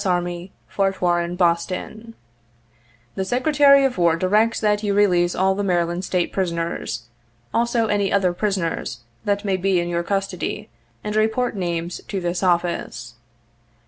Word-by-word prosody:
Army, 175 0 -2 0.2
Fort 195 -1 -1
Warren, 175 -1 +1
Boston: 185 +6 -1 0.5
' 120 0 -35
The 190 - -2
Secretary 280 +5 +4
of 250 -8 -1
War 170 -2 +4
directs 210 +6 +2
that 210 -1 +1
you 205 -2 0
release 180 -4 +3
all 190 +1 +2
the 205 +1 -2
Mary 175 -3 +2
land 175 +2 -4
State 180 -2 -1
prisoners, 170 - -2 0.5
also 235 0 +1
any 205 -2 0
other 190 -3 +2
prisoners 185 - -2 0.2
that 205 0 0
may 195 -2 +1
be 185 0 +1
in 175 0 -2
your 170 0 0
custody 195 0 -3 0.3
and 210 0 -3
report 220 +3 +1
names 170 -2 -3
to 195 - -3
this 175 -1 -2
office. 170 -9 -1
185 Hz, 150 wpm, -22 LUFS, 175-205 Hz, 0.5 s, Secretary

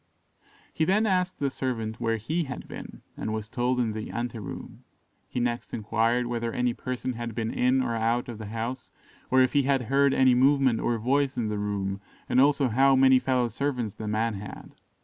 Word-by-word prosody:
He - - 0
then 200 +7 +3
asked 185 -2 +1
the 140 -1 -1
servant 115 -4 -3
where 115 -1 +1
he 155 +10 -2
had 130 -2 -7
been, - - -9
and 110 - -4
was 110 0 -4
told 125 +1 0
in 115 -3 0
the 110 0 -5
ante 120 -1 -4
room. 105 - -8 0.5
He - - -3
next 120 0 -2
enquired 115 +3 +1
whether 120 -1 -2
any 125 0 0
person 130 +1 -4
had 115 -1 -5
been 115 -1 -2
in 130 +1 +2
or 120 -2 -1
out 115 +2 0
of 115 -3 -7
the 110 - -6
house, 115 +4 -4 0.4
or 130 0 +5
if 130 - 0
he 145 - +4
had 135 -1 +1
heard 140 +4 +3
any 130 -1 +5
movement 130 -1 +4
or 120 - 0
voice 135 +4 +1
in 110 -3 -1
the 105 -1 -2
room, 100 -1 -2 0.3
and 130 - +4
also 140 -1 +4
how 135 +4 +4
many 130 0 +6
fellow 125 -2 +1
servants 120 -2 -2
the 110 - -7
man 110 +2 0
had. 100 +1 -9
120 Hz, 205 wpm, -27 LUFS, 115-130 Hz, 0.5 s, many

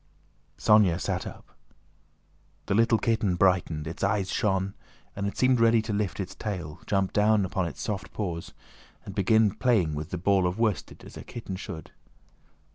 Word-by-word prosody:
Sónya 100 -5 +4
sat - - -2
up. - - -12 1.1
The - - -1
little 115 +2 +4
kitten 110 -4 +1
brightened, 90 -4 +2
its 80 +4 -6
eyes 100 -1 +1
shone, 95 -3 0 0.4
and 100 0 -2
it 100 - -5
seemed 130 -1 +3
ready 115 0 +5
to 110 - -3
lift 105 -2 -2
its 95 -1 -4
tail, 90 -6 -5
jump 95 -2 0
down 105 -1 +3
on 95 -3 0
its - - -7
soft 100 -2 -4
paws, 85 -6 -4 0.5
and 100 - -7
begin 105 +2 +3
playing 110 -8 +1
with 75 +2 -5
the 90 - -3
ball 95 +1 +2
of 90 +3 -3
worsted 110 -4 -1
as - - -11
a - - -8
kitten 110 -5 -7
should. 90 -5 -8
100 Hz, 170 wpm, -27 LUFS, 90-110 Hz, 1.1 s, ready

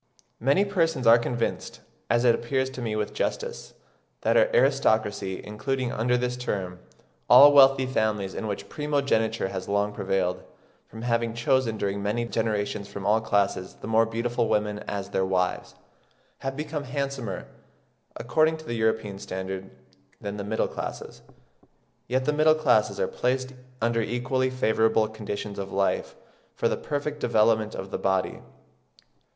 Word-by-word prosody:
Many 140 - +3
persons 165 - 0
are 115 +1 +8
convinced, 120 0 -3 0.3
as 120 +1 +2
it 120 - +6
appears 130 +3 -1
to 130 - -7
me 110 -2 -2
with 105 -1 -2
justice, 475 0 -3 0.5
that - - +2
our - - +5
aristocracy, 110 - +2
including 125 +4 -2
under 125 +2 +1
this 125 0 -1
term 95 -7 -4 0.5
all 145 +1 +9
wealthy 135 -1 +6
families 110 -6 -1
in 110 - -4
which 100 - -4
primogeniture 140 -9 0
has 95 -1 -5
long 100 +1 +1
prevailed, 95 -2 -1 0.5
from 110 +1 -10
having 115 -1 0
chosen 120 -1 +1
during 100 -1 -2
many 105 +4 -1
generations 105 -3 -2
from 100 -1 -7
all 110 +2 +3
classes 100 -4 0
the - - -6
more 110 0 +3
beautiful 115 +1 -1
women 105 0 0
as 100 -1 -4
their 95 - +1
wives, 90 -1 -1 0.6
have 135 0 -4
become 150 -1 -4
handsomer, 135 -7 -4 0.7
according 155 +6 +1
to 155 - -13
the 120 - -4
European 110 -3 -1
standard, 95 0 -5 0.5
than 100 0 -5
the 100 - -4
middle 110 +2 0
classes; - - -7 0.9
yet 130 +2 0
the 150 - +1
middle 155 +1 +4
classes 125 -9 +2
are - - +1
placed 130 +1 -1 0.3
under 115 0 +1
equally 125 +3 0
favourable 110 -3 +2
conditions 105 -2 -6
of 100 0 -5
life 100 0 0 0.4
for - - +1
the - - 0
perfect 150 0 -4
development 110 -2 +2
of 95 0 -7
the - - -3
body. 95 -1 0
115 Hz, 150 wpm, -26 LUFS, 105-130 Hz, 0.9 s, all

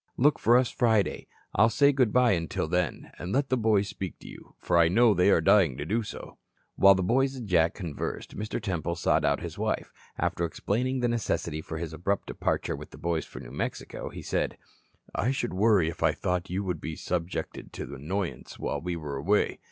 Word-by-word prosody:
Look 145 +4 +4
for 120 +2 +5
us 125 -1 +2
Friday. 110 -5 +1 0.3
I'll 115 - +5
say 140 +4 +4
good 130 -6 +2
bye 125 0 +4
until 85 -3 -1
then, 90 -2 -1
and 90 - -5
let 140 +3 +1
the 130 - +3
boys 110 -4 +2
speak 95 -2 -6
to - - -11
you, - - -13
for 85 -1 +1
I 85 - +6
know 115 +6 +5
they 90 +1 +3
are 85 - +5
dying 80 -6 +4
to 75 - -4
do 110 +8 0
so." 105 - -9 0.4
While 95 0 +7
the 95 - 0
boys 135 +7 +2
and 120 -4 -7
Jack 85 -1 +3
conversed, 85 -7 -5
Mr. 105 +2 -3
Temple 85 -6 -2
sought 85 - +2
out - - +1
his - - -7
wife. - - -2 0.2
After 85 - -1
explaining 125 +9 -1
the 120 - +2
necessity 115 -9 -1
for 80 0 -6
his 80 -1 -5
abrupt 100 +5 -1
departure - - -1
with - - -10
the - - -13
boys 85 -2 -1
for - - -10
New - - -10
Mexico, - - -4
he - - -9
said: - - -1 0.6
"I 115 - 0
should 130 -5 -1
worry 100 -3 +4
if 80 - -5
I - - +4
thought 90 +1 -2
you 95 +3 -2
would 90 -5 -3
be 80 - -4
subjected 90 +1 -4
to - - -6
annoyances 85 +7 -4
while - - -3
we 90 0 -3
were 75 -4 -5
away. 100 +10 +1
95 Hz, 215 wpm, -28 LUFS, 85-115 Hz, 0.6 s, While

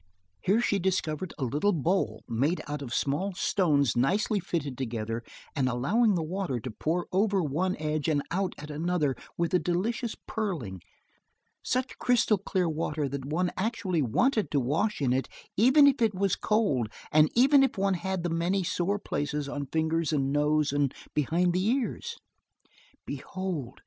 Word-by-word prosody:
Here 205 - +2
she 205 -4 +1
discovered 180 -2 -1
a 140 - -3
little 150 - +1
bowl, 175 +5 0
made 140 +10 0
out 145 0 -4
of 130 -4 -6
small 160 +10 -1
stones 150 -10 +2
nicely 200 - +2
fitted 160 -6 -3
together, 115 -3 -3 0.3
and 130 -4 +1
allowing 195 - +2
the 165 - 0
water 170 -6 -2
to 120 +2 -6
pour 165 +10 -1
over 195 0 +2
one 170 +6 -1
edge 155 0 -2
and 145 -2 +1
out 190 +2 -1
at 150 +1 -8
another 155 -3 0 0.2
with 170 0 -1
a 180 - +5
delicious 220 +8 -1
purling 155 - -3 0.8
such 255 +2 -2
crystal 235 -4 +3
clear 185 -2 0
water 155 -2 -1
that 135 0 -5
one 175 +5 0
actually 190 -5 -1
wanted 215 - +1
to 145 - +1
wash 155 - 0
in 125 -3 +2
it 130 +1 -1 0.3
even 260 +8 +6
if 275 -3 +4
it 220 -4 +2
was 195 0 +1
cold, 175 - +1 0.2
and 155 0 +5
even 270 +4 +6
if 270 -5 +1
one 195 0 +2
had 190 0 -2
the 175 - 0
many 175 +4 +1
sore 180 +4 0
places 150 -6 -3
on 140 0 -4
fingers 160 +1 0
and 135 -2 0
nose 150 0 +2
and 145 -2 +1 0.2
behind 170 +5 +1
the 180 +1 +1
ears. 245 +4 -1 0.9
Behold! 175 -10 -5
170 Hz, 165 wpm, -28 LUFS, 145-195 Hz, 0.9 s, even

